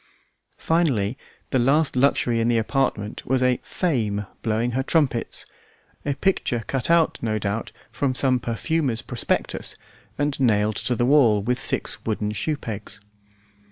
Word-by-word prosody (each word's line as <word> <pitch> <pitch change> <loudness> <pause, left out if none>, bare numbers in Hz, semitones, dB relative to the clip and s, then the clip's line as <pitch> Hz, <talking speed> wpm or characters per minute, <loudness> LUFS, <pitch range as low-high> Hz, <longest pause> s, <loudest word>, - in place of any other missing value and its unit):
Finally, 135 -11 +1 0.4
the 130 - +2
last 140 +5 +3
luxury 125 -3 +2
in 115 - +1
the 120 -1 +3
apartment 110 -3 -1
was 130 0 +1
a 125 -1 +2
"Fame" 110 - -1 0.2
blowing 115 +2 0
her 130 +3 0
trumpets, 135 -4 0 0.6
a 145 - -1
picture 130 - 0
cut 130 +5 -2
out, 170 -1 +3
no 110 -2 0
doubt, 105 +2 -3 0.2
from 135 -3 -1
some 130 -1 +3
perfumer's 120 +1 -1
prospectus 120 - -1 0.4
and 145 -1 -1
nailed 105 -4 +2
to 125 - 0
the 120 - +1
wall 120 -7 +4
with 125 +3 0
six - - 0
wooden 105 -1 -1
shoe 150 +8 -2
pegs. 110 -4 -6
125 Hz, 145 wpm, -23 LUFS, 110-140 Hz, 0.6 s, wall